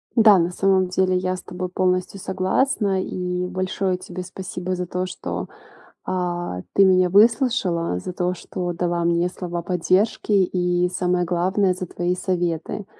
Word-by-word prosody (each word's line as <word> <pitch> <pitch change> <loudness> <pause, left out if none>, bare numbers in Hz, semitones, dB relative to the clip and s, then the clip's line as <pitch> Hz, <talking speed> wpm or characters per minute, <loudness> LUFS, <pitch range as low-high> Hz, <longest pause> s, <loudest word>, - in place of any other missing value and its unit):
Да, 215 -4 +7
на 170 0 +1
самом 190 0 +2
деле 185 0 +2
я 185 0 -1
с 180 - -8
тобой 180 0 -5
полностью 185 +1 0
согласна. 190 +2 0
И 180 -1 -3
большое 185 0 -1
тебе 180 0 -7
спасибо 185 0 -5
за 180 0 -3
то, 180 +1 -3
что, 185 - -5 0.6
а, 175 - -2
ты 195 - +6
меня 185 -1 +4
выслушала, 200 - +3
за 180 - -6
то, 180 0 -1
что 175 0 -5
дала 175 0 -1
мне 170 +1 +2
слова 175 -1 -5
поддержки 185 +5 0
и, 180 -2 +2
самое 180 0 0
главное, 185 +2 +1
за 185 0 -5
твои 175 +1 -1
советы. 175 +1 -2
180 Hz, 150 wpm, -22 LUFS, 175-190 Hz, 0.6 s, Да